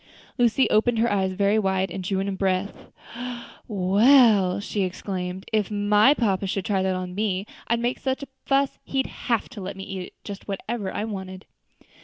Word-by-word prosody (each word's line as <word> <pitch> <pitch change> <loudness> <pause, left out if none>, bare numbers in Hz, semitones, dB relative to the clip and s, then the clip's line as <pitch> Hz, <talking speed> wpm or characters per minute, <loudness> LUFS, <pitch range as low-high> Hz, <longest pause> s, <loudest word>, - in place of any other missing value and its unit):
Lucy 240 +2 +4
opened 230 +2 +3
her 235 +2 +2
eyes 190 -2 +1
very 200 +3 +2
wide, 190 -2 0
and 185 - -5
drew 190 +1 -1
in 195 - -1
her 200 - -2
breath. 190 +1 -2 0.8
"Well," 205 0 +5
she 205 0 -3
exclaimed, 185 0 -4
"I - - +4
guess 210 - +1
if - - -14
my 210 +6 +4
papa 195 -6 0
should 190 0 -2
try 195 -2 +1
that 190 0 0
on 185 0 -4
me, 200 -1 -1 0.2
I'd 235 0 +1
make 240 +2 -1
such 265 +2 -2
a - - -7 0.2
fuss 275 0 +1
he'd 270 -1 -1
have 235 -4 -2
to 210 - -9
let 190 +1 -6
me 195 - -6
eat 190 -2 -6
just 200 -1 -8
whatever 200 0 -3
I - - -3
wanted." 190 -3 -6
200 Hz, 195 wpm, -25 LUFS, 190-225 Hz, 0.8 s, Well